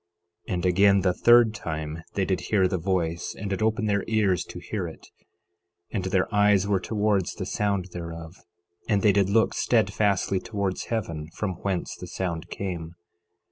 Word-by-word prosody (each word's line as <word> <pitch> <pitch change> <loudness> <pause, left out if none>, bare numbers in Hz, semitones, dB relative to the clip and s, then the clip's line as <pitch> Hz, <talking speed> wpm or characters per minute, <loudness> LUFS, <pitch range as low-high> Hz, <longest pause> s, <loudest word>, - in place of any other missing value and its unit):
11:5 - - -2
And 90 0 -2
again 100 +2 +5
the 90 -1 +2
third 120 +1 +5
time 80 -5 -5
they 95 - +1
did 95 -1 -1
hear 95 -3 +4
the 90 0 -2
voice, 85 -2 -1
and 100 0 -5
did 95 - -2
open 110 +1 +1
their 100 -1 +1
ears 100 -5 +2
to - - -9
hear 90 +1 -4
it; 80 - -11 0.9
and 95 -5 -2
their 95 0 +1
eyes 105 -1 +4
were 100 -2 +2
towards 105 -1 0
the 95 - -4
sound 100 -2 -1
thereof; 85 0 -7 0.5
and 105 -3 +2
they 105 - +6
did 100 -1 +2
look 110 +2 +3
steadfastly 100 -4 +1
towards 100 -3 -3
heaven, 80 -9 -3
from 105 -3 -2
whence 95 -3 -2
the - - -9
sound 85 -4 -4
came. 85 -4 -5
95 Hz, 175 wpm, -26 LUFS, 90-105 Hz, 0.9 s, they